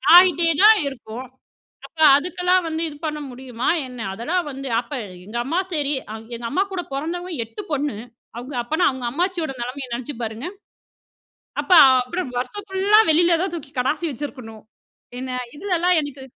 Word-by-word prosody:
ஆயிட்டேதான் 355 +3 +7
இருக்கும். 245 -2 -7 0.6
அப்ப 325 - -16 0.2
அதுக்கெல்லாம் 360 +3 +1
வந்து 320 0 -3
இது 295 - -11
பண்ண 300 -1 -2
முடியுமா 250 -1 -3 0.2
என்ன, 250 -1 -10
அதெல்லாம் 320 - -1
வந்து 270 0 -6
அப்ப 240 +4 -7 0.3
எங்க 215 +4 -6
அம்மா, 325 +7 0
சரி. 295 -2 0 0.4
எங்க 235 0 -7
அம்மா 375 +7 +2
கூடப் 355 -6 -5
பொறந்தவங்க 345 +6 -4
8 405 - -8
பொண்ணு. 285 -6 -1 0.4
அவங்க 255 +4 -7
அப்பனா 315 +8 +1
அவங்க 260 -2 -6
அம்மாச்சியோட 345 +1 -1
நிலைமைய 255 +2 -5
நினைச்சு 250 +4 -5
பாருங்க. 225 +3 -5 1.2
அப்ப - - -7 0.2
அ - - +7 0.5
வருஷம் 410 +11 -5
ஃபுல்லா 390 +2 +4
வெளியில 340 +2 +3
தூக்கி 280 -4 -8
கடாசி 295 +7 0
வச்சிருக்கணும். 250 -6 -7 0.6
என்ன 260 0 -5 0.2
இதுலலாம் 360 0 +1
எனக்கு 285 -2 -7
295 Hz, 145 wpm, -22 LUFS, 255-355 Hz, 1.2 s, ஆயிட்டேதான்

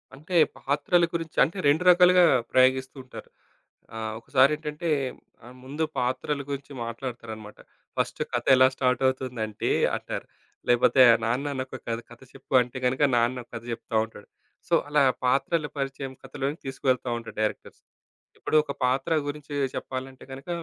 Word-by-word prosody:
అంటే 155 +6 -7 0.2
పాత్రల 150 +5 +2
గురించి 165 -2 -4
అంటే 160 +8 -2
2 150 +5 +3
రకాలుగా 180 0 +7 0.3
ప్రయోగిస్తూ 130 +1 +3
ఉంటారు. 130 - -11 0.7
ఆహ్, 110 -1 -4
ఒకసారేంటంటే 150 +6 +1 0.6
ఆహ్, 125 +1 -13
ముందు 145 +5 -3
పాత్రల 130 +3 -1
గురించి 140 0 -5
మాట్లాడతారనమాట. 115 -3 -7 0.4
ఫస్ట్ - - -1
కథ - - -1
ఎలా 130 0 +6
స్టార్ట్ 125 -1 +1
అవుతుందంటే 125 -5 -3 0.3
అంటారు. - - -5 0.4
లేపోతే 120 +2 +4 0.2
నాన్న 130 +6 -1
నాకొక 130 0 -6
కథ 115 0 -1
కథ 120 - -14
చెప్పు 135 0 -11
అంటే 125 +1 -5
గనక, 130 +3 0
నాన్న 120 +1 +1
ఒక - - -31
కథ 115 - -6
చెప్తా 115 0 -7
ఉంటాడు. 105 -2 -15 0.4
సో, - - -3 0.2
అలా 150 -1 +4 0.2
పాత్రల 145 +5 +1
పరిచయం 135 -1 -4
కథలోని 135 +3 -4
తీసుకవెళ్తా 130 -1 -1
ఉంటారు 115 -1 -9
డైరెక్టర్స్. 110 - -3 0.6
ఇప్పుడు - - -2
ఒక 145 - -5
పాత్ర 135 +6 +1
గురించి 145 0 -6 0.2
చెప్పాలంటే 130 0 -6
గనక 135 +5 -10
130 Hz, 140 wpm, -26 LUFS, 125-145 Hz, 0.7 s, రకాలుగా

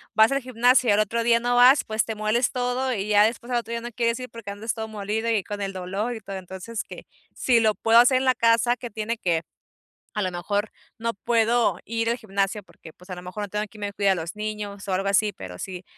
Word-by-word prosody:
vas 220 +3 +6
al 275 - +1
gimnasio 250 0 +3
y - - +6
al 205 - +3
otro 225 +2 +1
día 235 0 +4
no 245 +1 0
vas, 255 +3 +7
pues 220 0 0
te 225 - -5
mueles 215 +4 +1
todo 250 0 -1
y 205 -4 -2
ya 210 0 +6
después 235 +2 -3
al 240 - +2
otro 230 0 -9
día 235 0 -2
no 240 - -6
quieres 235 0 0
ir, 250 0 -7
porque 230 -3 -9
andas 215 +3 -3
todo 220 -1 -5
molido 215 +2 -3
y 215 -4 +1
con 205 -1 -6
el 195 -1 -3
dolor 195 +6 -3
y 220 - -8
todo. 195 0 -6
Entonces 190 +4 -6
que - - -11 0.3
si 240 -3 +3
lo 215 -2 +2
puedo 230 +1 +5
hacer 255 +2 +6
en 260 - 0
la 255 - +5
casa 230 +1 +3
que 240 - -7
tiene 220 +2 -3
que, 170 -4 0 0.7
a 210 - 0
lo 185 - 0
mejor 200 +4 -2 0.3
no 230 -1 -2
puedo 230 +2 +2
ir 230 0 -2
al 235 +2 +1
gimnasio, 200 -1 -1
porque 165 -4 -15
pues 180 +2 -19
a 180 - -4
lo 180 - -9
mejor 185 +4 -6
no 205 - -3
tengo 210 +1 -2
quien 210 +1 -15
me 200 0 -3
cuide 200 -1 +2
a - - +2
los 165 +2 -5
niños 210 -2 -5
o 190 - -1
algo 195 +2 0
así, 205 +1 +2
pero 90 -2 -9
si 185 - -6
220 Hz, 265 wpm, -24 LUFS, 200-235 Hz, 0.7 s, vas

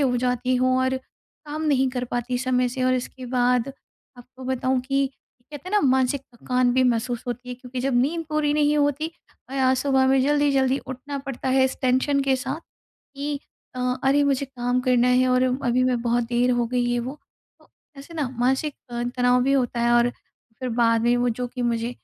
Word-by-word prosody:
हो 255 -3 +2
जाती 250 +1 0
हूँ 255 0 +2
और 260 0 +1 0.5
काम 300 +1 -4
नहीं 270 -3 +2
कर 250 -1 -3
पाती 245 +1 -2
समय 250 -1 +1
से। 255 +1 -4
और 255 0 +3
इसके 255 0 -5
बाद 245 0 +1 0.5
आपको 255 +2 -13
बताऊँ 260 0 0
कि 275 +2 0 0.4
कहते 295 +4 -8
हैं - - -8
ना 420 - +4
मानसिक 260 +1 +2
थकान 250 +1 +1
भी 260 - +4
महसूस 240 0 0
होती 245 +1 -5
है। 250 - -4
क्योंकि 250 0 -7
जब 265 0 0
नींद 325 +6 -1
पूरी 305 -1 +1
नहीं 300 0 +3
होती 290 +2 +1 0.4
और 275 - -5
आज 260 0 +3
सुबह 265 0 +2
में 265 0 +4
जल्दी-जल्दी 275 -2 +2
उठना 265 +2 -5
पड़ता 270 -1 -4
है 260 0 +4
इस 260 - -1
टेंशन 260 +2 +2
के 270 -1 +2
साथ 270 +4 -4
कि 285 -2 -8 0.4
अ, - - -3 0.2
अरे 275 +2 +4
मुझे 280 -1 +1
काम 250 -2 -1
करना 250 -1 +3
है 255 +1 +3
और 255 0 +3 0.2
अभी 245 +1 +2
मैं 250 -2 +1
बहुत 240 0 +1
देर 240 +1 +1
हो 240 -1 +1
गई 245 0 0
है 240 - +1
वो 260 +5 -6 0.4
तो - - -24 0.3
ऐसे 285 +5 -11
ना 300 -5 -1
मानसिक 265 +4 +1 0.2
अ, 240 0 -3
तनाव 250 0 +3
भी 270 +2 +2
होता 250 -3 0
है। 235 0 +2
और 240 0 +4 0.5
फिर 255 - -2
बाद 230 -1 +2
में 240 +1 +3
वो 245 0 +1
जो 245 +1 -2
कि 250 0 -5
मुझे 235 0 0
255 Hz, 205 wpm, -24 LUFS, 245-275 Hz, 0.5 s, ना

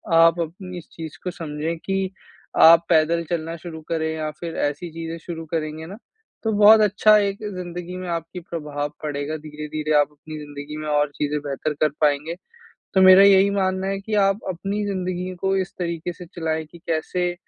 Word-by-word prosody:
आप 165 +1 +6
अपनी 180 +2 -5
इस 175 - -10
चीज़ 160 -2 -8
को 180 - -2
समझें 160 0 -4
कि 195 -1 -1 0.5
आप 165 +1 +8
पैदल 165 0 +3
चलना 165 -1 -2
शुरू 160 -1 -8
करें 160 -1 0
या 155 -1 -2
फिर 170 -1 -5
ऐसी 145 +4 -5
चीज़ें 165 +1 -5
शुरू 165 -1 -7
करेंगे 155 0 -3
ना, 190 +5 -9 0.5
तो 220 - +1
बहुत 215 +1 +8
अच्छा 210 +1 +5
एक 200 -1 0 0.2
ज़िंदगी 180 0 -6
में 185 0 -6
आपकी 170 +1 -4
प्रभाव 150 -4 -4
पड़ेगा, 150 +1 -3
धीरे-धीरे 155 0 -4
आप 145 - +3
अपनी 155 +1 -10
ज़िंदगी 145 0 -8
में 155 0 -5
और 150 -1 +2
चीज़ें 150 0 -1
बेहतर 145 +1 -3
कर 155 - +4
पाएँगे। 150 +2 +1 0.6
तो 190 - +5
मेरा 185 +1 +9
यही 200 0 +6
मानना 190 -1 0
है 195 0 -1
कि 215 +2 -4
आप 195 +1 +2
अपनी 195 +3 -2
ज़िंदगी 185 -1 -3
को 195 0 +1
इस 190 -1 -2
तरीके 170 -1 -3
से 180 0 -11
चलाएँ 160 -1 -2
कि 170 - -12
कैसे 175 +2 -1
170 Hz, 185 wpm, -23 LUFS, 155-185 Hz, 0.6 s, मेरा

